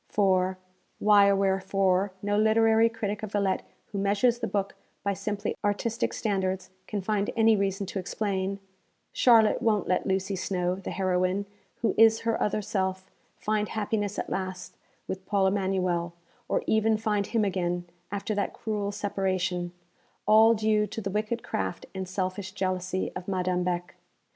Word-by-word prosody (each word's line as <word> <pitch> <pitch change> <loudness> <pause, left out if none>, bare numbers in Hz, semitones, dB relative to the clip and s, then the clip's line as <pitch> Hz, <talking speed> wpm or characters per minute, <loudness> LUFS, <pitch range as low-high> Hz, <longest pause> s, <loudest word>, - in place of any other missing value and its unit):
_ - - -30
For 185 -2 +2 0.4
(why 205 -1 +6
or 200 - +4
wherefore, 195 0 +1
no 205 0 +1
literary 220 +1 +4
critic 210 -3 -3
of 215 -2 -6
Villette 200 -2 +1 0.3
who 200 - -3
measures 205 +5 +2
the - - -2
book 200 -1 -1 0.3
by 200 - +1
simply 205 +1 -3
artistic 225 +3 0
standards 190 -3 -1 0.2
can 205 -3 -3
find 205 0 0
any 225 0 +5
reason 195 0 -1
to 195 +1 -4
explain) 195 0 -2 0.6
Charlotte 225 -3 +5
won't 215 -3 +1
let 180 - +1
Lucy 190 +1 0
Snowe, 180 -1 -1
the 195 - -6
heroine, 185 +1 0 0.4
who - - +2
is 225 0 +6
her 230 0 0
other 210 0 0
self, 190 -1 -2 0.3
find 215 0 -1
happiness 205 -1 -2
at - - -2
last 185 -1 -4 0.3
with 190 0 -5
Paul 200 -2 +2
Emanuel: 185 -3 0 0.4
or - - +1
even 220 0 +3
find 210 -2 0
him 225 -3 +1
again, 175 -2 -1 0.3
after 205 +2 -2
that 205 -1 -1
cruel 205 -2 -3
separation, 185 -3 -1 0.5
all 220 +2 +6
due 215 -1 +2
to - - -6
the 195 -2 -3
wicked 215 +3 -2
craft 95 -1 -3
and 190 -1 -5
selfish 190 0 -3
jealousy 185 -1 -2
of 180 - -6
Madame 180 -2 0
Beck. 175 0 -2
200 Hz, 160 wpm, -27 LUFS, 185-215 Hz, 0.6 s, why